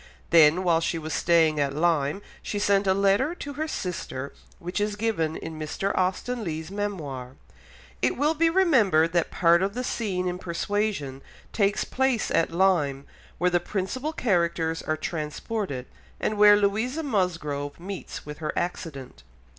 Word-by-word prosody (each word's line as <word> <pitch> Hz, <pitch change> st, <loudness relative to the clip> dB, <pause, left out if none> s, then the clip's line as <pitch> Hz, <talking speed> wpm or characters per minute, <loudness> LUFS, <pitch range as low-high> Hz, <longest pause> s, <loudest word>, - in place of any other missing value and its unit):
Then, 165 Hz, +2 st, +6 dB
while 170 Hz, -2 st, +3 dB
she 165 Hz, 0 st, -1 dB
was 155 Hz, 0 st, -5 dB
staying 160 Hz, -3 st, +3 dB
at 140 Hz, -1 st, 0 dB
Lyme, 160 Hz, +2 st, +1 dB, 0.2 s
she 205 Hz, -, -4 dB
sent 200 Hz, -1 st, +2 dB
a 190 Hz, -, +5 dB
letter 200 Hz, -, +2 dB
to 285 Hz, -4 st, -7 dB
her 310 Hz, +3 st, -3 dB
sister 155 Hz, -, -4 dB, 0.2 s
which 180 Hz, +4 st, -4 dB
is 205 Hz, 0 st, 0 dB
given 205 Hz, -8 st, -1 dB
in 160 Hz, -1 st, -7 dB
Mr. 155 Hz, +6 st, -2 dB
Austen 205 Hz, +6 st, -1 dB
Leigh's 160 Hz, -1 st, -4 dB
Memoir. 150 Hz, -11 st, -4 dB, 0.7 s
It -, -, +1 dB
will 295 Hz, +4 st, +2 dB
be 330 Hz, +1 st, +3 dB
remembered 230 Hz, -, +3 dB
that 170 Hz, -1 st, +1 dB
part 170 Hz, 0 st, +4 dB
of 200 Hz, +2 st, -1 dB
the 250 Hz, -, -2 dB
scene 190 Hz, -7 st, -2 dB
in 180 Hz, 0 st, -3 dB
Persuasion 175 Hz, -6 st, -2 dB, 0.3 s
takes 205 Hz, 0 st, +2 dB
place 265 Hz, -3 st, 0 dB
at 165 Hz, -, +2 dB
Lyme, 165 Hz, -6 st, +1 dB, 0.3 s
where 180 Hz, +1 st, +2 dB
the 175 Hz, -, +3 dB
principal 210 Hz, -, -3 dB
characters 170 Hz, -, 0 dB
are 155 Hz, -, -2 dB
transported, 155 Hz, -, -4 dB, 0.3 s
and 215 Hz, -, -1 dB
where 205 Hz, 0 st, +7 dB
Louisa 220 Hz, +9 st, 0 dB
Musgrove 170 Hz, -, -2 dB
meets 190 Hz, +2 st, -7 dB
with 150 Hz, 0 st, -8 dB
her 155 Hz, -1 st, -2 dB
accident. 145 Hz, -, -4 dB
180 Hz, 155 wpm, -26 LUFS, 160-210 Hz, 0.7 s, where